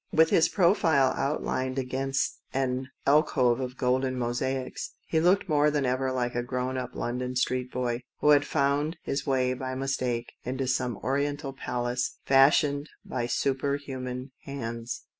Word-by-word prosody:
With 160 0 +4
his 160 - +5
profile 170 -8 +3
outlined 135 -2 -1
against 135 +1 -1 0.2
an 130 -1 0 0.2
alcove 135 -4 +3
of 125 -1 -4
golden 130 +1 +1
mosaics, 125 +2 -2
he 160 - +1
looked 180 +4 +3
more 150 -2 +3
than 145 -2 0
ever 130 +1 0
like 125 -1 -1
a 120 - 0
grown 125 +1 -2
up 130 - -4
London 125 +1 -3
street 125 0 0
boy, 120 -1 -1 0.2
who 150 - +2
had 145 -1 +6
found 145 +3 0
his 140 +1 -3
way, 130 -2 +2
by 130 0 -4
mistake, 130 -3 -2
into 130 +1 -2
some 125 -3 0
Oriental 140 +1 -1
palace 125 -1 -2
fashioned 140 +2 +4 0.2
by 120 -2 -2
super 140 +2 0
human 130 -2 -6
hands. 115 -4 -5
130 Hz, 150 wpm, -28 LUFS, 125-140 Hz, 0.2 s, had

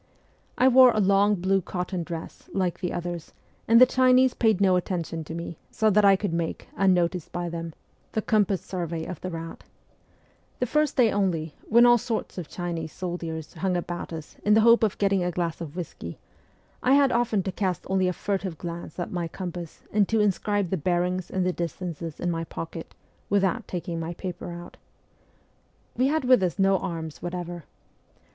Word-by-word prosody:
I 255 - +5
wore 260 0 +8
a - - +1
long 200 +1 +4
blue 190 +1 +1
cotton 180 0 -3
dress, 165 -1 -7
like 185 -3 0
the 180 -2 -2
others, 175 -1 -5 0.3
and 230 +1 +7
the 255 - +10
Chinese 255 0 +4
paid 220 -5 +2
no 190 -2 +4
attention 170 -3 -2
to 160 - -6
me, 170 -1 -6
so 220 -1 +2
that 210 +1 +4
I 200 -1 +7
could 190 -2 -2
make, 170 -1 -3
unnoticed 180 -3 +1
by 175 0 -3
them, 165 -1 -6 0.4
the 220 - -1
compass 205 -3 +2
survey 170 -3 -4
of 180 - -7
the 185 - -4
route. 165 -1 -7 0.9
The 250 - 0
first 300 +3 +1
day 235 -4 +5
only, 170 -6 0 0.2
when 235 +2 +7
all 240 0 +6
sorts 220 -4 -3
of 170 - -6
Chinese 170 -3 -4
soldiers 165 -4 -5
hung 180 +1 -1
about 175 0 -5
us 160 -2 -8
in 210 0 +4
the 220 - +6
hope 230 +1 +6
of 215 -3 +1
getting 195 -2 +2
a 175 - 0
glass 170 -1 -2
of 160 -2 -7
whisky, 160 - -6 0.6
I 260 +2 +4
had 280 -2 +4
often 230 -5 +1
to 190 - -2
cast 185 -2 -2
only 190 -1 +2
a 180 - 0
furtive 190 -3 -3
glance 170 -2 -7
at 175 - -4
my 175 -2 -2
compass 175 -2 -7
and 205 -2 +3
to 225 - +2
inscribe 205 -2 +1
the 190 - +1
bearings 180 +2 0
and 185 -1 -1
the 180 - +1
distances 170 -2 -5
in 175 - -1
my 165 -1 -2
pocket, 165 0 -7 0.3
without 200 +3 +1
taking 170 -2 -4
my 165 +1 -4
paper 180 -1 -6
out. 175 0 -9 1.2
"We 255 +2 +2
had 310 -1 0
with 250 -4 +6
us 180 -1 0
no 195 -1 +3
arms 160 -3 -5
whatever. 175 -2 -5
180 Hz, 190 wpm, -26 LUFS, 170-205 Hz, 1.2 s, the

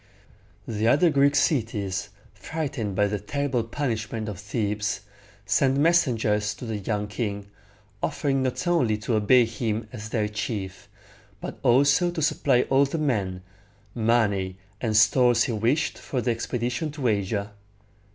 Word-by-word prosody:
The 110 0 -1
other 150 +7 +4
Greek 140 0 +3
cities, 105 - 0 0.2
frightened 135 -10 -4
by 105 - +3
the 100 0 -2
terrible 135 +3 -1
punishment 115 -3 -3
of 100 -3 -6
Thebes, 105 0 -2 0.4
sent 135 +6 +2
messengers 115 -10 +2
to - - -8
the 110 -2 -3
young 105 +1 -2
king, 100 -1 -4 0.6
offering 135 -2 0
not 130 +6 -2
only 155 -12 +2
to 105 +3 -3
obey 115 +3 +5
him 110 0 -3
as 110 -2 -7
their 105 -2 0
chief, 105 -2 -5 0.5
but - - -7
also 140 +8 +4
to 170 -2 -4
supply 135 -4 +2
all 135 +1 +3
the 140 +4 -3
men, 100 - -1 0.5
money, 105 -5 +1 0.2
and 110 -3 +1
stores 120 +2 +5
he 130 - -2
wished 115 +8 0
for 130 - -3
the 120 0 0
expedition 120 +5 -2
to 140 -4 -2
Asia. 100 -1 -1
115 Hz, 140 wpm, -25 LUFS, 105-135 Hz, 0.6 s, obey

